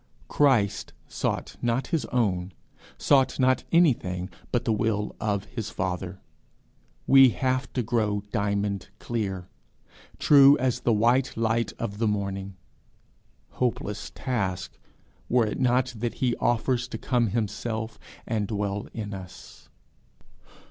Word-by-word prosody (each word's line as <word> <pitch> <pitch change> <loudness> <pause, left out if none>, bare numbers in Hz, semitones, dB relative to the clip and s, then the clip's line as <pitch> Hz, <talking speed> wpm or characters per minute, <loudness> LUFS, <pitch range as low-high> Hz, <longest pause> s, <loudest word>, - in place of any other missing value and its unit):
Christ 125 -9 +2
sought - - -3
not 120 +2 0
his 155 -7 +1
own, 95 -7 -1 0.4
sought 135 -1 +3
not 130 0 +3
anything 95 - +2 0.2
but 120 - 0
the 115 - +2
will 105 -1 -1
of 100 -2 -1
his 110 -4 -5
Father: 95 0 -3 0.9
we 135 -1 +8
have 130 +1 -1
to 125 - 0
grow 105 -3 0
diamond 100 -1 -1
clear, 95 -6 -3 0.7
true 140 0 +7
as 130 -1 0
the 120 - +1
white 120 +5 +2
light 115 +1 0
of 105 -3 -4
the 115 - +2
morning. 100 -2 -3 0.9
Hopeless 110 -4 -3
task! 100 -9 -3 0.5
were 120 -2 +3
it 105 - -3
not 125 0 +2
that 115 +1 -3
he 125 -2 0
offers 120 +1 +1
to - - -6
come 120 -2 +1
himself, 110 +1 -3 0.3
and 110 -3 -1
dwell 100 -1 -2
in 105 -2 -5
us. 95 -1 -11
115 Hz, 125 wpm, -26 LUFS, 100-125 Hz, 0.9 s, we